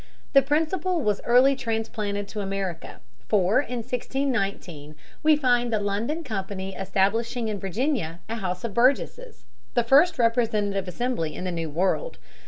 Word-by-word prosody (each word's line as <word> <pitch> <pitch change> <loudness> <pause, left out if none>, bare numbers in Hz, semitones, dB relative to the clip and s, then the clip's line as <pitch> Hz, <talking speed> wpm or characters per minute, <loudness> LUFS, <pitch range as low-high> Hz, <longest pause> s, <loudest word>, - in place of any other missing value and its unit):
The 275 - +8
principle 325 +5 0
was 210 -4 0
early 255 +3 +5
transplanted 220 -4 -3
to 210 - -4
America, 195 -4 -4 0.3
for 200 +2 +3
in 245 -4 -3
1619 220 - -3 0.3
we 310 0 +5
find 245 -4 +2
the 220 - +1
London 215 +11 -2
Company 195 -5 -4
establishing 220 +5 0
in 205 -2 -3
Virginia 195 - -2
a 225 +1 -3
House 180 -3 -3
of 230 -3 -4
Burgesses, 280 - +1 0.3
the 240 - +3
first 290 +8 +5
representative 215 -5 +1
assembly 180 -5 -2
in - - -5
the 185 - -2
New 165 -2 -3
World. 190 - -1
225 Hz, 145 wpm, -25 LUFS, 195-260 Hz, 0.3 s, The